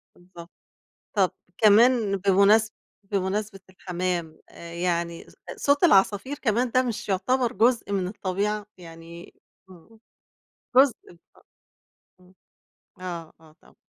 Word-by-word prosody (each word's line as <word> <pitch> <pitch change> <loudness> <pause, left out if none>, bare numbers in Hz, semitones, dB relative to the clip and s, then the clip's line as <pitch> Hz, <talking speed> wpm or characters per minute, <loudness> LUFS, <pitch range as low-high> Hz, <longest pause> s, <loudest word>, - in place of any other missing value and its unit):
بالضبط. 175 -1 -14 0.7
طب 190 -3 +3 0.3
كمان 220 -1 +4
بمناسب 200 +3 +3 0.4
بمناسبة 195 +1 -2
الحمام، 180 -3 -4
آآ 170 0 -12
يعني 170 -1 -3
ص - - -20 0.2
صوت 285 +3 +2
العصافير 205 - +3
كمان 240 0 0
ده 255 +2 +3
مش 235 -4 -5
يعتبر 235 +6 0
جزء 235 -2 +1
من 190 -2 -1
الطبيعة؟ 205 +1 -3
يعني 170 0 -12 0.4
إمم. 185 +5 -18 0.8
جزء 265 -1 +6 0.4
أ - - -21 0.8
إمم. 180 +1 -22 0.7
آه، 170 -3 -7
آه 155 -1 -20
طب - - -23
195 Hz, 110 wpm, -25 LUFS, 175-220 Hz, 0.8 s, جزء